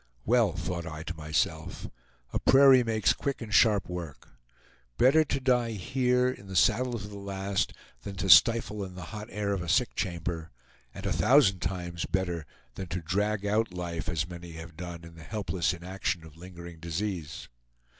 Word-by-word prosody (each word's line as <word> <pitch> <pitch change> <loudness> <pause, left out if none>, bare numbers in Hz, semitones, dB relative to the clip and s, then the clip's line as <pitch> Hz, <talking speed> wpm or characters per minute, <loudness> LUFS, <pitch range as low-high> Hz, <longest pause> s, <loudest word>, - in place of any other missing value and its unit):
"Well," 115 -5 +3
thought 85 -2 -4
I 80 0 -6
to - - -5
myself, 80 +1 -2 0.5
"a - - +1
prairie 135 -2 +7
makes 110 -2 +2
quick 140 -1 -3
and 110 -3 -7
sharp 105 -3 +4
work. 85 -5 -7 0.7
Better 140 +5 +5
to 140 - -1
die 125 -3 +1
here, 125 +4 +1
in 125 -6 -5
the 95 - -7
saddle 125 +7 +3
to 105 -2 -7
the 100 -1 -9
last, 100 0 -2 0.3
than 100 - -7
to 95 0 -3
stifle 105 +3 +6
in 95 -1 -8
the 90 - -7
hot 105 0 -6
air 105 -1 -2
of 95 - -2
a 85 - -5
sick 120 +8 +2
chamber, 85 -3 -3 0.4
and - - -9
a - - +1
thousand 125 -9 +4
times 90 -2 -3
better 90 -5 -2 0.3
than 95 - -6
to 90 +1 -4
drag 100 +4 0
out 105 -2 0
life, 85 -2 -4
as 80 -1 -1
many 85 -1 -9
have 80 0 -9
done, 85 0 -7
in 85 0 -12
the 80 -1 -12
helpless 90 -5 -1
inaction 90 -1 -3
of 80 -1 -14
lingering 85 -1 -11
disease." 85 -2 -4
95 Hz, 180 wpm, -29 LUFS, 85-110 Hz, 0.7 s, prairie